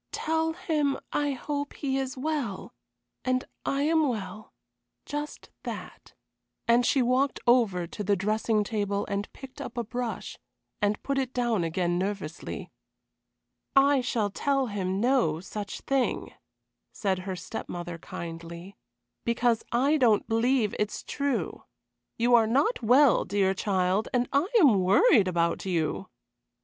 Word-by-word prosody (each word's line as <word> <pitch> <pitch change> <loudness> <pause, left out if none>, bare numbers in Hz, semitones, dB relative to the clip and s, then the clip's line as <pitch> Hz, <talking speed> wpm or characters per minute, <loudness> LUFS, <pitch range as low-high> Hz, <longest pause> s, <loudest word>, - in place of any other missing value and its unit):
Tell 320 0 0
him 300 -5 0 0.2
I 290 -1 +1
hope 285 +2 -4
he 270 -1 -1
is 265 -1 -4
well 270 -8 -3 0.5
and 255 0 0 0.2
I 275 +1 +1
am 315 0 +3
well 210 -2 -5 0.5
just 295 +1 -6
that," - - -8 0.5
and 235 +1 +5
she 265 - +3
walked 255 +3 +1
ever 220 -8 +4
to 205 +5 -6
the 200 +1 +2
dressing 215 +2 +1
table 205 -2 -1
and 200 0 -3
picked 265 -1 -11
up 240 - -7
a 235 - 0
brush, 240 +1 -5 0.4
and 205 0 0
put 275 -1 0
it 260 -1 -3
down 240 -6 +1
again 175 +1 0
nervously. 190 -4 -4 1.0
"I 275 0 +5
shall 220 -4 -1
tell 275 +5 +1
him 195 -4 -2
no 235 - +2
such 200 +3 -6
thing," 270 -2 -1 0.6
said 190 -3 -1
her 185 0 -4
step 180 - -7
mother, 175 -1 -5
kindly, 170 +3 -8 0.5
"because 235 -1 +2
I 275 +6 +3
don't 230 -7 +3
believe 225 -1 +2
it 210 - +1
is - - -7
true. 280 -3 -2 0.5
You 240 +1 +2
are 230 -2 +6
not 280 - +2
well, 250 +2 +5
dear 195 -1 +1
child, 190 +1 0
and 245 0 +2
I 285 +6 +3
am 245 - +6
worried 200 - +5
about 170 -2 0
you." 175 +1 -1
230 Hz, 140 wpm, -28 LUFS, 195-270 Hz, 1.0 s, are